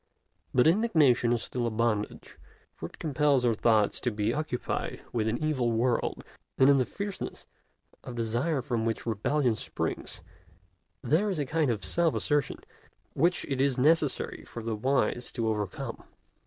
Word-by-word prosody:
But 125 - +4
indignation 160 - +4
is 120 -1 +1
still 120 -1 -2
a - - +1
bondage, 110 -2 -2 0.3
for 80 - -7
it - - -17
compels 145 -3 +2
our 120 - +3
thoughts 110 -2 +2
to 120 - 0
be 105 0 -1
occupied 150 -4 -3
with 110 -2 0
an 110 +2 0
evil 135 -6 0
world; 115 +1 0 0.3
and 130 +2 +6
in 140 - +4
the 130 - +1
fierceness 200 -1 -6 0.6
of 125 - -7
desire 120 +6 -1
from 120 -5 -1
which 115 -1 -2
rebellion 120 +3 +1
springs - - -4 0.8
there 185 +8 +2
is 190 - -2
a 145 - -1
kind 155 0 +1
of 105 -5 -1
self 170 -2 +2
assertion 145 -3 0 0.6
which 170 +5 +1
it 135 -2 -1
is 135 -2 +2
necessary 150 +1 +1
for 115 - -8
the 115 -1 -2
wise 125 +1 0
to 115 -3 -1
overcome. 105 -3 -3
125 Hz, 160 wpm, -28 LUFS, 115-150 Hz, 0.8 s, and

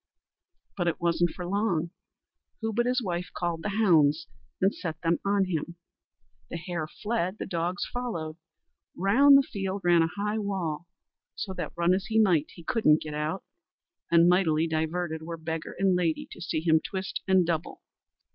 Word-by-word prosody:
But 175 -3 -1
it 165 - 0
wasn't 170 0 +2
for 180 - -7
long; 175 -4 0 0.7
who 225 -1 -2
but 240 +3 +1
his 250 0 +1
wife 180 -2 -3
called 170 -2 -2
the 210 - -2
hounds, 165 -7 +3 0.3
and 195 +2 +3
set 160 -2 -5
them 165 0 +2
on 200 -1 +2
him. 170 -1 -3 0.7
The - - -4
hare 170 -2 -4
fled, 205 +1 -2
the - - -4
dogs 175 +1 -2
followed. 170 -11 -4 0.6
Round 270 +10 +6
the 275 - +4
field 195 -4 -4
ran 175 -1 +5
a 165 - +2
high 210 +2 -1
wall, 175 -6 -3 0.5
so 190 - -4
that - - -5
run 170 +1 +3
as 195 +1 -1
he 220 - 0
might, 180 -9 +3
he 170 - -12
couldn't 160 -5 +3
get 155 -1 -6
out, 150 +5 -2 0.7
and 170 0 +6
mightily 165 -3 +3
diverted 160 +1 -2
were 165 +1 -6
beggar 160 0 -5
and 190 -1 +3
lady 170 -3 0
to - - -10
see 160 -2 -2
him 160 -1 +3
twist 190 0 -4
and 190 -2 +4
double. 165 0 -3
175 Hz, 175 wpm, -28 LUFS, 165-195 Hz, 0.7 s, Round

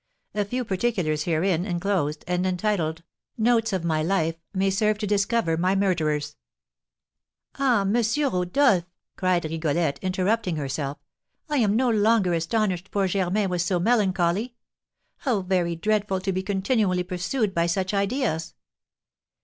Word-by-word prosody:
A 210 - 0
few 250 +4 -3
particulars 185 -7 -1
herein 170 +1 +1
enclosed, 175 -5 -1
and 180 0 0
entitled 180 -4 -1 0.3
'Notes 225 0 +2
on 185 -3 -2
My 160 -2 +1
Life,' 165 -1 0
may 195 0 +1
serve 210 +2 +1
to 210 - -3
discover 200 -3 +1
my 185 +3 +1
murderers." 155 -6 0 1.2
"Ah, 250 -6 +3
M. 195 +1 0 0.2
Rodolph," 200 - +2 0.3
cried 185 -2 +1
Rigolette, 155 -2 -1
interrupting 185 +1 0
herself, 140 -1 -3 0.5
"I 295 - 0
am 215 -5 +2
no 255 +2 +2
longer 215 -4 +3
astonished 185 +1 -1
poor 200 -1 0
Germain 195 +2 0
was 180 -1 0
so 180 0 0
melancholy! 200 +1 +1 0.6
How 240 -8 0
very 180 -2 0
dreadful 205 +2 0
to 195 +1 -1
be 185 0 -1
continually 195 -1 0
pursued 185 +5 -2
by 170 -1 +1
such 190 +3 -1
ideas!" 200 - -1
190 Hz, 135 wpm, -25 LUFS, 170-210 Hz, 1.2 s, Ah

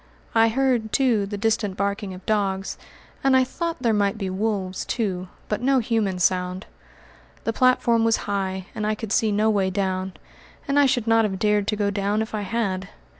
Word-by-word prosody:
I 225 0 +5
heard, 240 -3 +1
too, 235 -7 +2
the 205 0 -4
distant 210 -2 0
barking 200 0 -2
of 185 - -13
dogs, 195 -3 0 0.5
and 270 -1 +5
I 260 - +5
thought 330 +2 -4
there 230 -2 +3
might 200 0 +1
be 195 -3 -3
wolves, 195 -2 -2
too; 190 -6 -2 0.2
but 210 - -2
no 270 +2 +3
human 220 -5 0
sound. 180 +1 0 0.8
The 225 - -1
platform 240 -2 +3
was 225 0 +3
high 190 -2 -2
and 215 -1 -2
I 215 - +1
could 215 -1 -6
see 220 -1 +2
no 215 +2 +2
way 195 -3 +1
down, 190 -1 -2 0.5
and 280 0 +3
I 285 - +6
should 245 -4 +1
not 225 0 +4
have 195 -3 -1
dared 210 0 +1
to 215 - +1
go 205 -1 0
down 205 +2 0
if 220 - -10
I 215 - -1
had. 195 -2 -2
210 Hz, 195 wpm, -24 LUFS, 195-225 Hz, 0.8 s, I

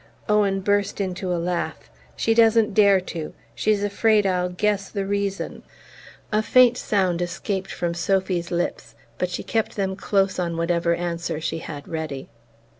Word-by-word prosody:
Owen 205 -2 +2
burst 205 +1 0
into 185 -1 -2
a 175 - +1
laugh. 175 +1 -3 0.3
"She 225 - +1
doesn't 225 -2 +4
dare 200 -2 +5
to 165 -4 -6 0.2
she's 205 - +1
afraid 210 +1 +3
I'll 180 -1 +1
guess 200 +2 0
the 200 -1 -3
reason!" 200 0 -2 0.7
A 215 0 +3
faint 250 +2 +5
sound 185 -7 0
escaped 190 +2 -3
from 170 -1 -2
Sophy's 180 -1 0
lips, 175 0 -3 0.2
but 180 - 0
she 175 - -4
kept 225 -1 -1
them 190 -2 -1
close 195 -1 +1
on 170 -2 -1
whatever 170 0 +1
answer 170 -2 -3
she 165 +1 -3
had 145 -3 -8
ready. 155 -5 -5
190 Hz, 155 wpm, -23 LUFS, 175-205 Hz, 0.7 s, dare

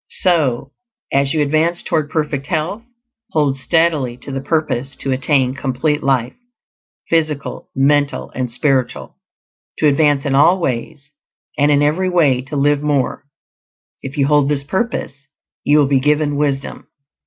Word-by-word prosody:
So, 140 -8 0 0.4
as 140 0 +2
you 155 - +2
advance 160 +4 0
toward 155 -2 -1
perfect 150 -3 -2
health, 170 +7 -2 0.5
hold 145 -4 +2
steadily 145 -3 +1
to 140 - -7
the 135 0 -3
purpose 140 -3 -1
to 135 - -2
attain 130 -1 +1
complete 135 +3 -1
life, 130 -3 0 0.7
physical, 155 -3 -2
mental, 145 +1 +1
and 130 -1 -3
spiritual; 130 0 -1 0.6
to 155 - +3
advance 145 -1 +2
in 140 - 0
all 160 +7 +5
ways, 145 0 -4 0.4
and 145 +1 +2
in 145 0 +3
every 170 +6 +1
way 150 -8 +3
to 130 +3 -8
live 145 +1 +2
more; 145 -2 -1 0.8
if 135 +1 -8
you 140 - +3
hold 145 -1 +3
this 145 -2 -1
purpose 145 - -3 0.4
you 145 +1 +4
will 150 - +5
be 135 -1 +3
given 150 +1 +1
wisdom. 140 -1 -2
145 Hz, 145 wpm, -18 LUFS, 135-155 Hz, 0.8 s, all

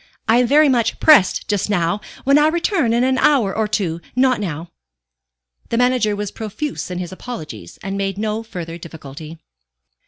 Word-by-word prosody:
I 225 +2 +4
am 250 - +3
very 300 +4 +5
much 240 -4 +1
pressed 300 -12 +5
just 205 -1 -1
now. 180 0 0 0.2
When 275 +2 +4
I 300 - +4
return 330 - +1
in 235 +1 +2
an 260 0 +1
hour 240 -10 +3
or 220 -1 0
two, 180 -6 -2
not 255 -2 +3
now." 170 -4 -5 1.0
The 230 - -1
manager 245 -4 +2
was 205 -1 -4
profuse 225 +6 -5
in 180 - -4
his 175 -1 -5
apologies, 155 - -8
and 195 +1 -4
made 195 -1 -2
no 215 +1 -2
further 175 -7 -7
difficulty. 160 -1 -10
210 Hz, 175 wpm, -19 LUFS, 180-250 Hz, 1.0 s, very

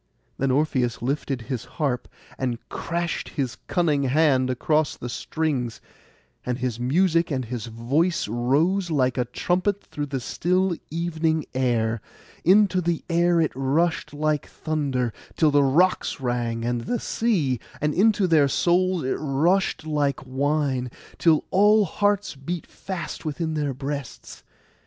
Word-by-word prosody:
Then 135 - +1
Orpheus 130 -4 +1
lifted 135 -1 -1
his 125 -1 -4
harp, 140 -7 -1 0.3
and 125 -3 -2
crashed 170 0 -3
his 130 -4 -1
cunning 160 -6 +2
hand 135 -2 +3
across 150 +4 +1
the 120 - -6
strings; 135 -4 -2 0.6
and 125 -1 -2
his 125 -3 -2
music 165 +6 +2
and 130 -4 -2
his 120 0 -5
voice 135 - 0
rose 145 - +1
like 130 -5 +1
a 125 - +1
trumpet 180 - -1
through 145 -1 -5
the 135 -1 -3
still 180 +7 0
evening 160 -1 -1
air; 115 -4 0 0.4
into 190 0 +5
the 170 -1 -1
air 170 0 +3
it 160 -3 +2
rushed 145 +6 0
like 150 0 -1
thunder, 135 -7 -2 0.2
till 155 -2 +4
the 145 0 +5
rocks 165 +7 +2
rang 120 -2 -2
and 120 -1 -1
the 240 - 0
sea; 165 - 0 0.2
and 150 0 0
into 205 +1 +3
their 160 -5 +4
souls 180 +4 +2
it 130 - -1
rushed 155 +4 +1
like 145 -3 -1
wine, 135 -1 0 0.3
till 160 -3 +4
all 210 +2 +5
hearts 205 +3 0
beat 155 +5 -5
fast 190 -3 -6
within 160 +1 -2
their 145 -3 -1
breasts. 140 -1 -6
150 Hz, 140 wpm, -24 LUFS, 130-170 Hz, 0.6 s, into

